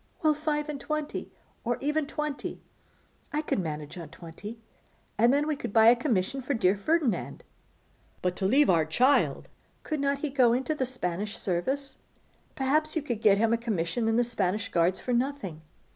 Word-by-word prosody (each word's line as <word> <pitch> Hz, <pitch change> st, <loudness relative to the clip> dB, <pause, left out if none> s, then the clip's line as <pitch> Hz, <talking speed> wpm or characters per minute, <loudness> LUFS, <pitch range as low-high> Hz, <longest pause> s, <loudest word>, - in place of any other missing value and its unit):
'Well, 310 Hz, -1 st, +5 dB
five 300 Hz, 0 st, -1 dB
and 290 Hz, -2 st, -5 dB
twenty, 305 Hz, 0 st, -3 dB, 0.3 s
or 240 Hz, 0 st, 0 dB
even 300 Hz, +1 st, 0 dB
twenty. 300 Hz, -1 st, -4 dB, 0.7 s
I 300 Hz, 0 st, -1 dB
could 295 Hz, -, 0 dB
manage 155 Hz, -1 st, -5 dB
on 165 Hz, -3 st, -8 dB
twenty. 175 Hz, +8 st, -9 dB, 0.6 s
And 235 Hz, +3 st, +4 dB
then 285 Hz, +2 st, +2 dB
we 305 Hz, -1 st, 0 dB
could 275 Hz, -, -5 dB
buy 225 Hz, +1 st, +7 dB
a 240 Hz, -, +7 dB
commission 240 Hz, -1 st, -1 dB
for 260 Hz, +2 st, -1 dB
dear 190 Hz, -3 st, +3 dB
Ferdinand.' 295 Hz, +4 st, 0 dB, 0.8 s
'But 180 Hz, 0 st, 0 dB
to 190 Hz, -, +1 dB
leave 280 Hz, +7 st, +5 dB
our 165 Hz, -3 st, +4 dB
child!' 250 Hz, -, +2 dB, 0.4 s
'Could 310 Hz, -2 st, -2 dB
not 280 Hz, 0 st, +1 dB
he 285 Hz, 0 st, -3 dB
go 250 Hz, -4 st, +4 dB
into 265 Hz, +5 st, 0 dB
the 265 Hz, -4 st, -1 dB
Spanish 205 Hz, -4 st, -4 dB
service? 265 Hz, +10 st, -2 dB, 0.6 s
Perhaps 305 Hz, +4 st, +1 dB
you 320 Hz, -, 0 dB
could 240 Hz, -7 st, -3 dB
get 205 Hz, -3 st, +5 dB
a 230 Hz, +1 st, +3 dB
commission 220 Hz, -1 st, -1 dB
in 225 Hz, 0 st, +2 dB
the 245 Hz, -, +4 dB
Spanish 215 Hz, -3 st, -1 dB
Guards 170 Hz, +2 st, +2 dB
for 250 Hz, -, -2 dB
nothing. 240 Hz, -, -2 dB
245 Hz, 175 wpm, -28 LUFS, 195-285 Hz, 0.8 s, buy